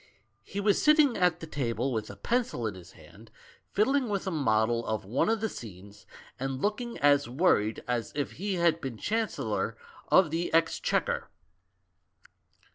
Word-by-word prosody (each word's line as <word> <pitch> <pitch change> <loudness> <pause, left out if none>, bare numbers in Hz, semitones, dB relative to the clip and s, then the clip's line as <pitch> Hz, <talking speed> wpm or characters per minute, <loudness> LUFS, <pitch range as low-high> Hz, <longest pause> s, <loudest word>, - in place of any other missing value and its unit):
He 200 - -6
was 200 0 +2
sitting 300 -4 +5
at 180 -2 +2
the - - -5
table 130 -4 -2
with 110 -2 -3
a 100 - -8
pencil 230 - -1
in 105 - -2
his 90 -2 -13
hand, - - -16 0.4
fiddling 255 +4 +2
with 200 -2 -2
a 190 - -2
model 115 -6 +1
of 110 -3 -2
one 120 - +1
of 225 -1 +1
the 220 - +1
scenes, 100 - -11 0.3
and 135 0 -3
looking 225 - -2
as 145 -2 +3
worried 120 - +2
as 120 -3 -2
if 145 -1 -2
he 200 +1 -3
had 170 -2 +2
been 130 -4 -5
Chancellor 220 - -2 0.3
of 185 -5 +5
the 170 +2 -1
Exchequer. 485 - +1
155 Hz, 160 wpm, -29 LUFS, -, 0.4 s, sitting